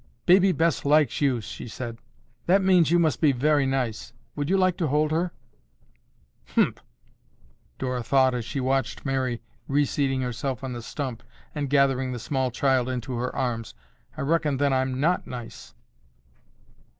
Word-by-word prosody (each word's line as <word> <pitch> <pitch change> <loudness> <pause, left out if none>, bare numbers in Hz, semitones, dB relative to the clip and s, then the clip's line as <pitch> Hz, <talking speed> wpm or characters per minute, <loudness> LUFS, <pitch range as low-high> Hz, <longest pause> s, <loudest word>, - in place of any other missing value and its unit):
"Baby 190 +2 +6
Bess 165 -1 +1
likes 150 -2 +3
you," 130 -5 +2
she 110 - -8
said. 115 0 -6 0.5
"That 190 +3 +4
means 180 -5 +4
you 175 - +4
must 160 -3 +1
be 150 -3 +5
very 145 +2 +2
nice. 125 -4 -2 0.2
Would 145 +1 -2
you 195 - +3
like 185 -2 +3
to 165 - 0
hold 150 +2 +1
her?" 170 +2 0 1.2
"Humph!" - - +2 1.0
Dora 125 -1 -2
thought 130 +1 +3
as 120 -2 -2
she 120 +4 -4
watched 130 0 -1
Mary 130 -3 -1 0.2
reseating 140 -1 +1
herself 125 +1 -3
on 130 -1 -4
the 120 - -6
stump 125 -1 -5 0.3
and 145 -3 -3
gathering 135 -2 +2
the - - -4
small 130 +2 -1
child 130 0 +1
into 130 0 -4
her 125 +2 -3
arms, 115 -3 -3 0.4
"I - - -4
reckon 150 -1 +1
then 140 0 +2
I'm 130 0 0
not 170 +6 +1
nice." 120 -2 -9
135 Hz, 160 wpm, -25 LUFS, 125-150 Hz, 1.2 s, Baby